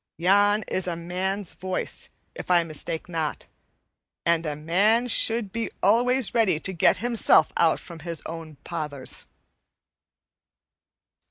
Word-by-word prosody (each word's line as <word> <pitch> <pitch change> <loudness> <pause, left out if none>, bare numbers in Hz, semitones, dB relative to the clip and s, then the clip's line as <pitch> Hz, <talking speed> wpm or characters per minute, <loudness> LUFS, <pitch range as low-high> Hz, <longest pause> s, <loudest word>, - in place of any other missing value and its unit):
Yon 205 +5 +3
is 185 -1 -1
a 175 - -2
man's 185 +3 -2
voice, 185 0 -3 0.2
if - - -9
I 175 -1 +4
mistake 160 +1 -4
not, 160 -4 -3 0.8
and 170 -1 +2
a 150 - -2
man 195 +10 +2
should 225 -3 +1
be 230 +2 -3
always 250 0 +3
ready 210 -9 +2
to 190 - -4
get 170 - +3
himself 230 -9 +4
out 165 -2 +3
from 170 -2 -11
his 165 0 -5
own 160 -1 -7
pothers." 150 -6 -5
175 Hz, 125 wpm, -25 LUFS, 165-205 Hz, 0.8 s, I